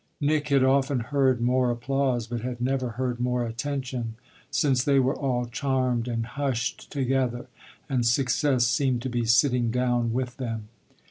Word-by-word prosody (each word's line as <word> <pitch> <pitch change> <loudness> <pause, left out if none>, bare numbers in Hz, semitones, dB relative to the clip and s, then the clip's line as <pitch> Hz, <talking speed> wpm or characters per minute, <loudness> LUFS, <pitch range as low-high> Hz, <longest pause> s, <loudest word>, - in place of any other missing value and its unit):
Nick 150 0 +1
had 140 -2 +3
often 135 0 +2
heard 130 0 +1
more 125 +1 +2
applause, 125 0 0
but 120 0 -4
had 125 0 -4
never 130 0 0
heard 125 -2 -2
more 125 0 0
attention, 125 -1 -4 0.3
since 140 -3 +2
they 140 0 +3
were 130 +1 +2
all 125 -3 -1
charmed 125 -1 -1
and 115 -2 -2
hushed 130 -1 -3
together 130 -3 0 0.4
and 130 -4 0
success 125 +1 +2
seemed 130 -1 +1
to 130 - -2
be 120 -1 -1
sitting 120 0 +3
down 120 -1 +1
with 125 +1 -3
them. 115 -4 -5
125 Hz, 155 wpm, -26 LUFS, 120-135 Hz, 0.4 s, had